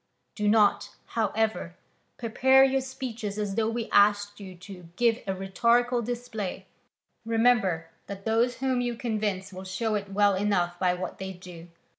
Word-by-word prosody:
Do 210 -1 -2
not, 210 -1 +3
however, 220 -4 -1 0.4
prepare 265 +3 +4
your 270 0 +2
speeches 240 -5 -5
as 205 -2 -2
though 220 +1 0
we 230 0 -3
asked 205 0 +3
you 190 -2 -9
to 180 -2 -12
give 235 +1 +2
a 190 - -1
rhetorical 235 +6 +1
display: 220 -5 -5 0.6
remember 225 -7 +2 0.2
that 200 0 -8
those 230 +3 +2
whom 260 -1 0
you 240 -1 -2
convince 210 -5 -3
will 185 +1 -8
show 205 +4 -2
it 200 -1 -2
well 205 0 +3
enough 185 -3 0
by 180 -1 +2
what 180 +1 -6
they 190 0 -5
do. 175 -2 -12
210 Hz, 155 wpm, -27 LUFS, 190-235 Hz, 0.6 s, prepare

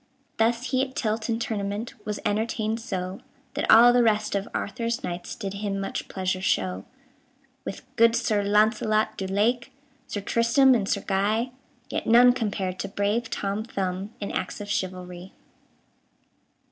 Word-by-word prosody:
Thus 235 +2 +1
he 260 -1 +2
at 265 -1 -3
tilt 220 -1 -1
and 230 0 0
tournament 210 +1 -3
Was 210 0 -2
entertained 220 +1 0
so, 190 -5 -4 0.3
That - - -2
all 240 +2 +8
the 245 - +5
rest 215 -2 +2
of 200 0 -1
Arthur's 235 +3 -3
knights 175 0 -5
Did 195 -1 -5
him 200 -1 -3
much 195 - -4
pleasure 185 -1 -2
show. 95 - 0 0.8
With - - -6
good 230 0 +5
Sir 220 -3 +1
Launcelot 215 +1 +2
du 190 - -4
Lake, 225 +5 +1 0.4
Sir 205 - -4
Tristram 235 +6 +4
and 205 -5 0
Sir - - 0
Guy, 210 +5 +1 0.4
Yet - - -3
none 245 +2 +7
compared 200 -6 -2
to - - -2
brave 205 +4 -1
Tom 200 +2 -2
Thumb 195 -2 -3
In 200 - -4
acts - - -3
of 205 0 -5
chivalry. 185 -3 -4
210 Hz, 155 wpm, -26 LUFS, 195-230 Hz, 0.8 s, all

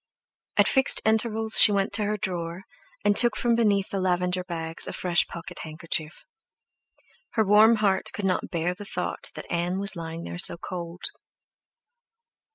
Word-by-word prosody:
At - - +4
fixed 265 -1 +3
intervals 220 0 +3
she 210 - +8
went 200 0 -1
to 210 0 0
her 210 +1 -2
drawer, 175 -1 -5 0.4
and 205 0 +3
took 240 +3 +6
from 240 -1 +1
beneath 210 -4 +1
the 195 - -3
lavender 180 0 -1
bags 165 -2 -1
a - - -5
fresh 175 -1 +1
pocket 175 +1 -9
handkerchief. 155 0 -4 1.1
Her 220 - +1
warm 215 +3 +6
heart 200 -3 0
could 205 - -5
not 185 -1 -1
bear 170 +1 -2
the 200 +3 -10
thought - - -4
that - - -8
Ann 175 +2 -1
was 200 +1 +1
lying 165 0 -7
there 175 - -7
so 170 - +2
cold. 170 0 -8
190 Hz, 165 wpm, -25 LUFS, 170-210 Hz, 1.1 s, she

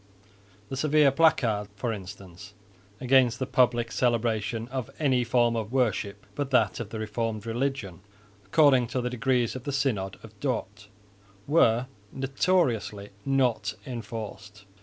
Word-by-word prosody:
The - - -4
severe 150 0 +4
placards, 120 -9 +2
for 115 +2 -2
instance, 100 0 -10 0.4
against 125 -2 +4
the 130 - -2
public 120 -2 +2
celebration 115 -2 0
of 130 -3 -4
any 130 -5 +2
form 120 0 +2
of 110 -1 -3
worship 105 -6 -1
but 145 -2 -3
that 115 -7 +2
of 115 -4 -5
the 110 - -6
Reformed 110 0 -3
religion, 120 -5 -2 0.4
according 135 - +4
to 125 - -2
the 125 0 -2
decrees 125 -1 0
of 130 - -6
the 140 - -3
Synod 110 -9 -1
of 110 -1 -12
Dort, 110 -6 -3 0.6
were 125 -6 +3 0.3
notoriously 130 - 0 0.2
not 125 -6 +1
enforced. 110 -4 -7
120 Hz, 135 wpm, -27 LUFS, 105-130 Hz, 0.6 s, severe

